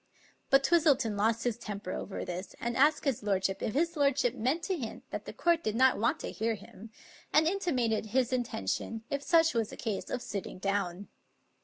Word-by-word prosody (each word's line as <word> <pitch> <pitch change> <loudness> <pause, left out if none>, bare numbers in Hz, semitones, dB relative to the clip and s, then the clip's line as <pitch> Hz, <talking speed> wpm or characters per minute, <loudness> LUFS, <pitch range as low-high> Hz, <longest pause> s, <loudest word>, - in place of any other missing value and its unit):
But 270 0 +5
Twistleton 285 -11 +3
lost 225 +3 +1
his 240 -2 -1
temper 205 -4 -5
over 195 - -4
this, 180 +1 -6
and 235 0 -2
asked 295 +4 +3
his 270 -5 0
lord 195 -2 0
ship 195 0 -1
if 215 - -2
his 335 +3 +1
lordship 280 -4 +2
meant 270 +9 -1
to 380 0 0
hint 240 -9 -6
that - - -5
the - - -6
court 340 -1 +1
did 215 0 -1
not 260 -1 +4
want 230 - +1
to - - -4
hear 225 +1 -1
him; 215 +1 -12 0.4
and 305 +2 +5
intimated 255 - 0
his 250 +3 +1
intention, 225 - -2
if 280 0 -1
such 325 +2 +4
was 225 -3 0
the - - -9
case, 215 -4 -3
of 250 - -3
sitting 200 -2 -5
down. 195 -1 -2
235 Hz, 200 wpm, -31 LUFS, 210-280 Hz, 0.4 s, But